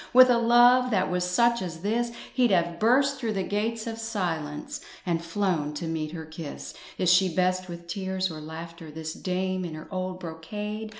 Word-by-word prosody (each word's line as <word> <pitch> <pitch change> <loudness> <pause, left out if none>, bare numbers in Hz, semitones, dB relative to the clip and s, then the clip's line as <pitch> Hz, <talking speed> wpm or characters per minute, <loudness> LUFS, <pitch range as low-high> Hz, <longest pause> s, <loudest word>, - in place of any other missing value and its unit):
With 255 0 +9
a 235 - +4
love 240 +2 +6
that 190 -5 +1
was 180 0 +1
such 235 +7 +3
as 165 -3 -5
this 230 +4 0 0.2
He'd 250 -2 +3
have 170 -3 +1
burst 275 +4 +3
through 230 -4 -1
the 195 -2 -1
gates 220 +3 -1
of 225 -1 -5
silence, 170 -10 -3 0.2
And 170 -2 0
flown 165 -4 -1
to 165 - -4
meet 160 -2 -2
her 160 -2 -6
kiss." 160 -1 -7 0.2
Is 180 -1 +4
she 185 +1 +5
best 185 +1 +1
with 170 0 -8
tears 190 0 -2
or 155 -1 -7
laughter, 165 +1 -8
This 160 +1 -5
dame 185 0 -2
in 165 -3 -5
her 155 - -9
old 185 -1 -3
brocade? 210 +6 -5
185 Hz, 190 wpm, -27 LUFS, 165-220 Hz, 0.2 s, With